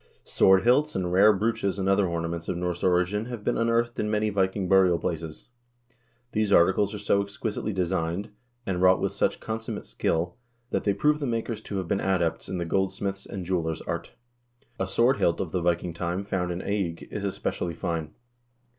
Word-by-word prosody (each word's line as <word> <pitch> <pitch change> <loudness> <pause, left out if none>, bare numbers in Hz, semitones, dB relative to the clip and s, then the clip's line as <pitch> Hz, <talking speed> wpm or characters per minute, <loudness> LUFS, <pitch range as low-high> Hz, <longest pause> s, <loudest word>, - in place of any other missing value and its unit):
Sword 95 0 +4
hilts 145 +6 +3
and 90 -2 -1
rare 100 +4 +7
brooches 105 -1 0
and 95 -1 -1
other 95 0 +3
ornaments 85 0 -3
of 85 - -1
Norse 90 -1 -2
origin 90 +4 +2
have 120 -3 -6
been - - 0
unearthed 115 +1 +1
in 105 - 0
many 105 0 +1
Viking 95 -1 0
burial 95 -2 +5
places. 80 0 -5 0.8
These 110 -2 0
articles 100 +4 +4
are - - -4
so 100 0 +2
exquisitely 105 +2 -3
designed, 90 0 -1 0.3
and 90 -2 -1
wrought 95 0 +5
with - - -1
such - - 0
consummate 110 -1 -5
skill 85 +2 -1 0.3
that - - -1
they 100 -2 +2
prove 150 0 +2
the 140 - -2
makers 115 -2 -2
to 100 - -5
have 95 -2 -3
been 100 - 0
adepts 90 -4 0
in 95 - -2
the 85 - -2
gold 95 +3 +1
smith's 100 -1 -4
and 95 -3 -6
jeweler's 85 -3 -1
art. - - -4 0.7
A 95 - 0
sword 120 +6 +3
hilt 85 - +1
of 90 - -3
the 90 - -1
Viking 85 0 0
time 85 +3 -2
found 90 -3 -2
in 90 +1 -3
Eigg 95 -5 -2
is 105 - -4
especially 90 -3 -2
fine. 85 -4 -3
95 Hz, 190 wpm, -26 LUFS, 90-105 Hz, 0.8 s, rare